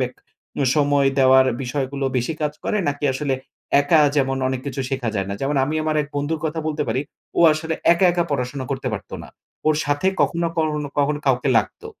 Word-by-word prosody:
Back 125 -1 -2 0.6
সময় 145 -2 +3
দেওয়ার 130 0 +6 0.2
বিষয়গুলো 135 +1 -3
বেশি 125 +6 0
কাজ 150 - 0
করে? - - 0
নাকি 145 +1 -3
আসলে 135 -1 -1 0.5
একা 150 +2 +4 0.2
যেমন 135 -1 +1
অনেক 130 -1 -2
কিছু 140 0 -3
শেখা 130 -4 -2
যায় 95 -2 -1
না? 100 - -3
যেমন 140 +1 -1
আমি 150 +3 -3
আমার 155 0 0
এক 140 - -10
বন্ধুর 150 +2 -2
কথা 160 +1 -2
বলতে 155 -1 -1
পারি 130 - 0 0.4
ও - - +4
আসলে 160 +1 -3 0.2
একা, 175 +2 +2
একা 175 -1 +1
পড়াশোনা 130 0 -2
করতে 135 -1 -2
পারতো 100 - -6
না - - -11 0.4
ওর 155 - +3
সাথে 145 +5 0 0.2
কখনো, 170 -1 0
কখনো, 150 -2 -1
কখনো 145 +1 +1
কাউকে 130 0 +2
লাগতো - - -5
145 Hz, 195 wpm, -21 LUFS, 130-155 Hz, 0.6 s, দেওয়ার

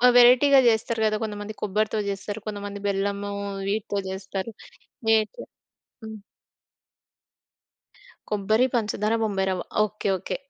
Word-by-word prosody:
వెరైటీగా 250 +3 +7
చేస్తారు 225 0 0
కదా! 215 0 +2
కొంతమంది 210 0 -5
కొబ్బరితో 215 +2 0
చేస్తారు. 200 +2 -4
కొంతమంది 205 -1 -5
బెల్లము 200 +1 -1 0.4
వీటితో 205 0 -1
చేస్తారు. 190 +2 -5 0.6
వేటి 220 -1 +2 0.6
హ్మ్. 220 -1 -8 2.1
కొబ్బరి, 215 +4 +2
పంచదార, 215 -1 0
బొంబాయి 195 -3 0
రవ్వ. 185 -1 -2 0.2
Okay 215 0 -5
okay. 185 - -4
210 Hz, 105 wpm, -25 LUFS, 200-220 Hz, 2.1 s, వెరైటీగా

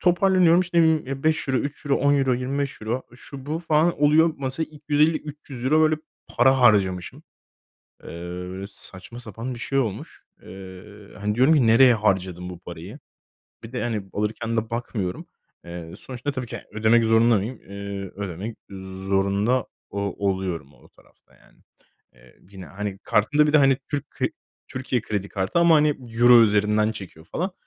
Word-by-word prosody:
toparlanıyorum. 180 -1 +4
İşte, 175 -1 0
ımm, 155 -5 +2
€5, 155 -2 +1
€3, 140 +3 -2
€10, 140 0 +3
25€ 135 +1 0 0.4
şu 135 +1 -11
bu 155 +2 -2
falan 160 -1 +1
oluyor. 155 +2 +5
Mesa 135 +4 -2
€250-300 150 -3 -1
böyle 155 0 +4 0.3
para 130 +2 +3
harcamışım. 95 -7 +2 0.8
Eee, 90 +3 -6
saçma 100 +3 -8
sapan 115 +2 -6
bir - - -10
şey 135 +3 0
olmuş. 110 -7 -4 0.2
Eee, 95 -1 -10 0.3
hani 105 +1 -2
diyorum 130 +7 +5
ki, 130 -6 +3
nereye 120 +3 +7
harcadım 95 -4 -1
bu 90 -2 -9
parayı. - - -9 0.6
Bir 115 - -9
de 125 - -3
hani 110 -5 -3
alırken 110 +2 -2
de 110 0 -1
bakmıyorum. 115 -6 -4 0.4
Eee, 85 -1 -8
sonuçta 130 +2 -5
tabii 130 -3 -5
ki - - -6
ödemek 110 +2 +3
zorunda 115 +1 +4
mıyım? 110 +6 -4
Eee, 100 -1 -6
ödemek 100 +3 -6 0.5
zorunda 100 +6 +1 0.2
o 100 - -5 0.3
oluyorum 90 -7 -3
o 65 - -21
tarafta - - -26
yani. - - -25 0.5
Eee, - - -22
yine, 95 -2 -10
hani, 100 0 -6
kartımda 145 +8 +3
bir 150 - 0
de - - +8
hani 135 -2 +4
Türk 145 -1 -3
k - - -2 0.4
Türkiye 130 -2 -2
kredi 100 -2 -3
kartı. 95 - -1
Ama 170 -1 +6
hani 150 0 +4 0.3
Euro 120 0 +8
üzerinden 105 0 +2
çekiyor 90 -6 -10
falan. 185 - -3
115 Hz, 150 wpm, -24 LUFS, 100-140 Hz, 0.8 s, de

